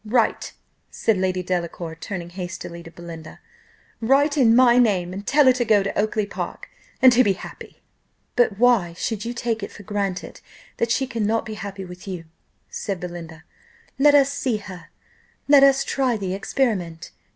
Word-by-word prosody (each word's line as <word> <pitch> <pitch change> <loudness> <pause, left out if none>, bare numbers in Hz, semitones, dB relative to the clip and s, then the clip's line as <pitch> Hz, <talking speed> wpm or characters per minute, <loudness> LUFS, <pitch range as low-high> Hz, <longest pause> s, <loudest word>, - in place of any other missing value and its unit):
Write," 225 +1 0 0.4
said 225 - 0
Lady 185 -1 -1
Delacour, 170 -2 -3
turning 175 +1 -7
hastily 175 -1 -7
to 165 - -11
Belinda, 165 -2 -10 0.6
"write 280 +5 +3
in 235 -6 +5
my 245 -1 +6
name, 185 -7 +2
and 200 +2 -7
tell 290 +1 +4
her 260 - +7
to 250 -1 0
go 215 -4 +3
to 200 - -4
Oakly 215 0 0
park, - - -6 0.3
and 255 -1 +9
to 250 +2 +5
be 200 -4 +2
happy." 185 - -11 0.5
"But 230 -5 +2
why 225 -8 +3
should 210 +5 -3
you 240 +1 -4
take 230 -2 -2
it 200 - -6
for 205 - -12
granted 200 -2 -4 0.4
that 235 - 0
she 235 +3 +1
cannot 225 -3 -1
be 220 - -6
happy 200 -2 -7
with 180 +2 -11
you?" 180 -3 -6 0.4
said 195 -3 -4
Belinda. 170 -2 -8 0.6
"Let 290 +1 +6
us 280 -1 +4
see 255 -5 -1
her 190 -3 -11 0.6
let 285 -1 +7
us 275 -1 +5
try 260 -4 0
the 190 -3 -3
experiment." 195 -6 -2
205 Hz, 175 wpm, -23 LUFS, 180-240 Hz, 0.6 s, and